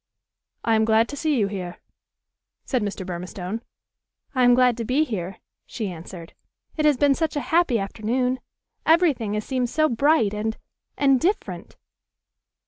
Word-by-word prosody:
"I 225 - +2
am 220 0 +4
glad 220 +1 +3
to 285 - -5
see 300 -1 0
you 210 - +3
here," 185 -3 -5 0.9
said 255 -3 0
Mr. 205 -2 -4
Burmistone. 180 +4 -5 0.7
"I 255 -2 +2
am 245 0 +6
glad 250 -1 +4
to 235 - -2
be 255 +7 +2
here," 195 - -4 0.3
she 210 -5 -4
answered. 170 0 -10 0.4
"It 305 - 0
has 295 -3 +4
been 285 +1 +4
such 320 +2 -1
a - - +1
happy 335 -8 +4
afternoon. 235 +5 -1 0.4
Every 330 -1 +5
thing 220 -4 -4
has 210 - -3
seemed 255 -2 -1
so 310 +4 +2
bright 240 -3 +3
and 220 +1 -2 0.4
and 275 -2 +4
different!" 380 +8 -2
235 Hz, 160 wpm, -24 LUFS, 205-280 Hz, 0.9 s, am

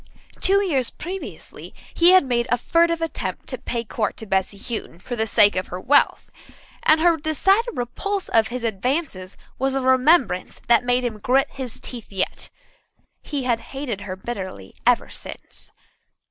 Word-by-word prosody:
Two 395 +1 +3
years 270 -9 +1
previously 370 +3 -8 0.2
he 345 +1 +6
had 370 -5 +6
made 240 -1 0
a 245 - +3
furtive 335 +5 +2
attempt 325 - -4
to - - -4
pay 235 -1 -3
court 215 -1 -2
to 220 - -7
Bessy 195 0 -1
Houghton 215 -4 -5
for 245 +7 -6
the 220 -1 0
sake 210 -2 +5
of 185 0 -1
her 180 - -6
wealth, 280 +9 +2 0.5
and 310 +1 +5
her 335 0 +4
decided 385 - +2
repulse 385 - -3
of 225 -1 +3
his 250 0 -5
advances 225 - -2 0.2
was 270 +1 0
a 270 - 0
remembrance 260 - +3
that 235 0 +5
made 245 0 +1
him 225 -3 -3
grit 260 +5 +2
his 260 -4 -7
teeth 235 -5 -9
yet. 190 -1 -2 0.7
He 285 -3 -4
had 240 -2 +1
hated 250 -5 -5
her 185 - -5
bitterly 190 - -7
ever - - +4
since. - - -10
245 Hz, 165 wpm, -22 LUFS, 215-310 Hz, 0.7 s, he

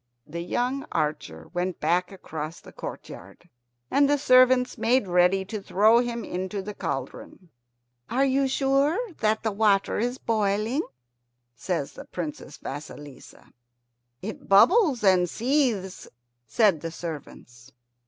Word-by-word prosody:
The 170 +3 -6
young 250 +9 -1
archer 150 - -3
went 180 0 -2
back 175 +4 +1
across 160 -4 -7
the - - -14
courtyard, 100 - -10 0.4
and 280 0 +4
the 290 - +3
servants 255 -2 +4
made 230 -1 +1
ready 180 +2 +3
to 210 +1 -6
throw 215 +5 +4
him 240 -1 -3
into 190 +2 -4
the 210 +2 -6
cauldron. 140 +4 -6 0.6
"Are 265 +3 +2
you 270 0 +2
sure 275 +4 +2 0.2
that 220 0 +1
the 220 - 0
water 200 -1 +2
is 245 +3 -1
boiling?" 215 +4 0 0.7
says 145 - -3
the - - -10
Princess 160 -4 -7
Vasilissa. 145 0 -10 0.7
"It 215 +3 -7
bubbles 275 - +5
and 185 -3 +4
seethes," 235 - -1 0.4
said 195 - +3
the 165 - -4
servants. 140 -7 -9
200 Hz, 125 wpm, -25 LUFS, 170-245 Hz, 0.7 s, bubbles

